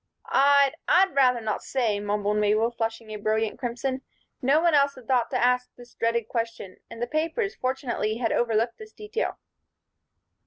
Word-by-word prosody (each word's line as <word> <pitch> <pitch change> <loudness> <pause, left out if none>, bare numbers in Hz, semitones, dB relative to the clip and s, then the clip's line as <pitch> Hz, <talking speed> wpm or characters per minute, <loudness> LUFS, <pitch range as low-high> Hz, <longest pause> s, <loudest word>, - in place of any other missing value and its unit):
"I'd 280 0 +4 0.2
I'd 380 -2 +4
rather 250 -3 +3
not 215 -1 -2
say," 230 -6 -1
mumbled 205 0 -1
Mabel, 215 +2 +2
flushing 225 -1 -4
a 215 - -4
brilliant 215 +2 -1
crimson. 260 +1 -3 0.4
No 275 +4 +4
one 340 0 +3
else 280 -1 +3
had 255 -3 -14
thought 250 -3 +2
to 255 - -1
ask 250 0 +1
this 245 0 -15
dreaded 230 -1 -1
question, 225 -5 -4
and - - -10
the 240 - 0
papers, 330 - -1
fortunately, 250 -4 -2
had 235 -2 -1
overlooked 230 0 0
this 435 0 -11
detail. 425 +2 -4
240 Hz, 165 wpm, -26 LUFS, 225-275 Hz, 0.4 s, I'd